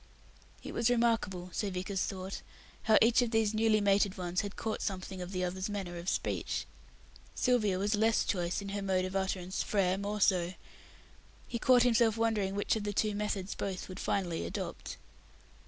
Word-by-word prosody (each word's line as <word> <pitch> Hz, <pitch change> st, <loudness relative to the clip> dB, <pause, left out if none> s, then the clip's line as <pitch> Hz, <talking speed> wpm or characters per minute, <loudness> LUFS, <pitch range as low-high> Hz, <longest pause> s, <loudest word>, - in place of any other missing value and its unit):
It -, -, -7 dB
was 230 Hz, 0 st, +2 dB
remarkable 225 Hz, -7 st, +1 dB
so 205 Hz, -, -1 dB
Vickers 185 Hz, +1 st, -3 dB
thought 190 Hz, 0 st, -4 dB, 0.4 s
how 220 Hz, 0 st, +5 dB
each 235 Hz, +2 st, +5 dB
of 245 Hz, -, +1 dB
these 225 Hz, -2 st, +2 dB
newly 220 Hz, 0 st, +3 dB
mated 200 Hz, 0 st, +2 dB
ones 180 Hz, 0 st, -1 dB
had 205 Hz, -1 st, -6 dB
caught 220 Hz, -1 st, -3 dB
something 190 Hz, -1 st, -4 dB
of 180 Hz, +1 st, -6 dB
the 185 Hz, -1 st, -2 dB
other's 185 Hz, +2 st, -2 dB
manner 190 Hz, -4 st, -4 dB
of 175 Hz, +2 st, -3 dB
speech. -, -, -2 dB, 0.7 s
Sylvia 220 Hz, -7 st, +2 dB
was 205 Hz, +3 st, 0 dB
less 220 Hz, +1 st, +3 dB
choice 180 Hz, 0 st, -1 dB
in 200 Hz, -, -6 dB
her 200 Hz, 0 st, -3 dB
mode 190 Hz, -1 st, +1 dB
of 185 Hz, +1 st, -5 dB
utterance; 190 Hz, -1 st, -1 dB
Frere 190 Hz, -2 st, +1 dB
more 205 Hz, +1 st, -3 dB
so. 180 Hz, -2 st, +2 dB, 0.9 s
He 235 Hz, -, -3 dB
caught 250 Hz, 0 st, +5 dB
himself 230 Hz, -2 st, +3 dB
wondering 215 Hz, -4 st, +1 dB
which 205 Hz, -, +1 dB
of 220 Hz, -, -3 dB
the 205 Hz, 0 st, -2 dB
two 210 Hz, +1 st, +1 dB
methods 205 Hz, -2 st, -2 dB
both 190 Hz, -2 st, -4 dB
would 185 Hz, +1 st, -8 dB
finally 175 Hz, -4 st, -1 dB
adopt. -, -, -5 dB
200 Hz, 180 wpm, -32 LUFS, 185-220 Hz, 0.9 s, how